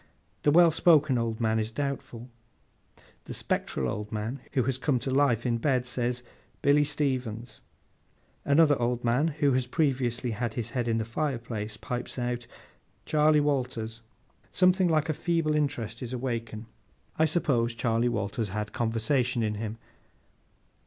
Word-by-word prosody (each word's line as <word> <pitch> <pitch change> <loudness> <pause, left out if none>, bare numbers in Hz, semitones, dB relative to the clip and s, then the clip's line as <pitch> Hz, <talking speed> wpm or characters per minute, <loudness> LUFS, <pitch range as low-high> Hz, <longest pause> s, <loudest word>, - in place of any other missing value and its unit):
The - - +3
well 170 +2 +6
spoken 155 -5 +4
old 115 -1 -2
man 110 -1 +1
is 110 0 -1
doubtful. 125 -2 -4 1.0
The - - -7
spectral 65 - -1
old 105 +11 -4
man 110 +5 -3
who 130 -3 +2
has 130 +1 -1
come 135 -1 +1
to 130 +2 -3
life 130 -4 +2
in 120 -2 +1
bed, 130 -1 +1
says, 125 -1 -2 0.4
'Billy 145 0 +5
Stevens.' 130 -6 -2 0.8
Another 145 -2 +4
old 120 0 0
man 120 +6 +2
who 145 -2 +1
has 125 -1 0
previously 125 -4 0
had 110 +1 -3
his 120 -3 -4
head 125 -3 -1
in 115 -1 +1
the 110 - -1
fireplace, 115 -5 -3
pipes 125 +3 -5
out, 120 -1 -3 0.6
'Charley 150 0 +4
Walters.' 125 -6 -1 0.5
Something 185 0 +4
like 160 -1 +2
a 155 - 0
feeble 165 -1 0
interest 120 -7 -1
is 125 0 -5
awakened. 115 -3 -4 0.5
I 160 - +5
suppose 130 -8 +1
Charley 115 0 +1
Walters 110 -1 -2
had 105 +2 -4
conversation 120 +2 0
in 105 -1 0
him. 110 +1 -5
125 Hz, 150 wpm, -28 LUFS, 115-145 Hz, 1.0 s, well